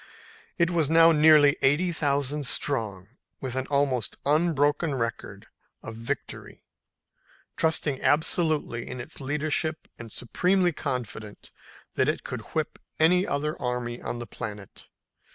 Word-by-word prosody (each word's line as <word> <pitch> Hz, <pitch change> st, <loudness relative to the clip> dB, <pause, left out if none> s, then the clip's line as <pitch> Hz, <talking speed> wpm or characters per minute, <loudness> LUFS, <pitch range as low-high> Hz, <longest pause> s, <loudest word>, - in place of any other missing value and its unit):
It 170 Hz, -1 st, +2 dB
was 165 Hz, -4 st, +1 dB
now 165 Hz, +1 st, +7 dB
nearly 150 Hz, -2 st, +6 dB
eighty 155 Hz, +7 st, +2 dB
thousand 145 Hz, -2 st, 0 dB
strong, 105 Hz, -12 st, 0 dB, 0.3 s
with 130 Hz, -2 st, -5 dB
an 130 Hz, 0 st, -2 dB
almost 140 Hz, -5 st, 0 dB
unbroken 150 Hz, 0 st, +2 dB
record 115 Hz, -2 st, -4 dB, 0.4 s
of 115 Hz, -, -7 dB
victory, 120 Hz, +4 st, -6 dB, 0.9 s
trusting 155 Hz, -4 st, +1 dB
absolutely 155 Hz, -5 st, +1 dB
in 125 Hz, -, -6 dB
its 120 Hz, -, -10 dB
leadership 150 Hz, +2 st, -2 dB
and 115 Hz, -2 st, -9 dB
supremely 180 Hz, -, +1 dB
confident 110 Hz, -6 st, -6 dB, 0.4 s
that -, -, +1 dB
it -, -, -2 dB
could -, -, -5 dB
whip -, -, -2 dB, 0.2 s
any 180 Hz, +4 st, +4 dB
other 150 Hz, +2 st, -1 dB
army 125 Hz, -1 st, -3 dB
on -, -, -4 dB
the 120 Hz, -, -6 dB
planet. 105 Hz, -3 st, -8 dB
145 Hz, 125 wpm, -26 LUFS, 125-155 Hz, 0.9 s, now